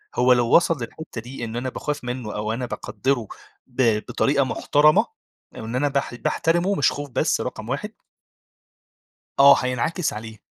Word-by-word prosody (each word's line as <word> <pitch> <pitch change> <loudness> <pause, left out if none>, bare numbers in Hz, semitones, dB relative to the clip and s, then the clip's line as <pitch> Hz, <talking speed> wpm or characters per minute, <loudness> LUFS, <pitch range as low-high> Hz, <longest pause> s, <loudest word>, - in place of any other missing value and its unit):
هُو 125 0 +5
لو 120 -1 +3
وَصل 165 -1 +4
للحتة 115 0 -8
دي 120 +1 -8
إن 115 0 -7
أنا 130 +2 -2
باخاف 145 +2 -4
منه، 125 -3 -5
أو 105 +1 -2
أنا 125 +2 -3
باقَدّره 125 -1 -2 0.4
ب 125 -4 +2
بطريقة 140 0 +1
محترمة، 145 +3 +3 0.5
أو - - -7
إن 115 +2 -5
أنا 145 +3 +1
باح 140 -3 -2
باحترمه، 175 +9 0
مش 145 - +3
خوف 145 0 -6
بس 125 - 0
رقم - - -6
1 - - -3 1.5
آه 140 0 +9
هينعكس 135 +7 -1
عليه. 110 -1 -9
130 Hz, 160 wpm, -23 LUFS, 120-145 Hz, 1.5 s, آه